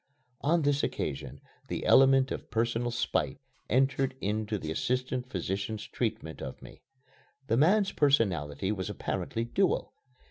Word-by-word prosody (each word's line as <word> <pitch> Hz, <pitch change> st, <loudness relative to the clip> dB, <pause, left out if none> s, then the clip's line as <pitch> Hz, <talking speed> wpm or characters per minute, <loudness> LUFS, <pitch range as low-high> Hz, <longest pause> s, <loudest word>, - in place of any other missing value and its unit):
On 165 Hz, +2 st, +2 dB
this 145 Hz, 0 st, +2 dB
occasion -, -, -3 dB, 0.3 s
the -, -, -3 dB
element 135 Hz, 0 st, +6 dB
of -, -, -5 dB
personal 115 Hz, +1 st, 0 dB
spite 120 Hz, +1 st, -1 dB, 0.3 s
entered 135 Hz, +1 st, +2 dB
into 105 Hz, +1 st, -1 dB
the 80 Hz, -5 st, -5 dB
assistant 125 Hz, +6 st, -1 dB
physician's 100 Hz, +3 st, -3 dB
treatment 110 Hz, -9 st, -3 dB
of -, -, -6 dB
me. -, -, -13 dB, 0.6 s
The 115 Hz, -, +1 dB
man's 190 Hz, -, +4 dB
personality 95 Hz, -, +1 dB
was 95 Hz, -4 st, -3 dB
apparently 115 Hz, -, -3 dB
dual. 190 Hz, +10 st, 0 dB
120 Hz, 130 wpm, -30 LUFS, 105-135 Hz, 0.6 s, element